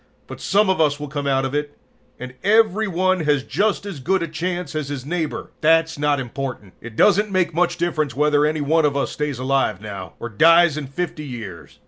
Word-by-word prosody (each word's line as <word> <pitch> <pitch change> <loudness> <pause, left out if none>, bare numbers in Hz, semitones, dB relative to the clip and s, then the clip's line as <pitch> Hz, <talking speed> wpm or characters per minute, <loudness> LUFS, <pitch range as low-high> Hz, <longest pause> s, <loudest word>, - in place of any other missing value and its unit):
But - - -10
some 205 +1 +2
of 190 -3 +2
us 145 -2 +2
will 150 - -5
come 145 0 -3
out 135 -1 +1
of 135 - -4
it, 145 0 -3 0.4
and 125 0 -7
every 215 +1 +3
one 185 +1 +1
has 150 -4 +1
just 200 - 0
as 195 -8 -6
good 185 +7 0
a - - -3
chance 175 0 -4
as 155 -3 -3
his 135 -3 -5
neighbor. 165 0 -3
"That's 160 -1 +3
not 145 -1 +1
important. 125 -6 -6
It 120 -1 -10
doesn't 210 - +4
make 185 -3 0
much 175 +1 +1
difference 155 -6 -1
whether 150 0 +3
any 155 0 0
one 160 +3 +2
of 145 -1 +1
us 140 - -1
stays 150 -3 -3
alive 130 -6 0
now, 100 -3 -8
or 120 - -5
dies 165 +8 +5
in 150 -3 -5
50 155 +2 -4
years. 110 - -9
150 Hz, 210 wpm, -21 LUFS, 135-175 Hz, 0.4 s, dies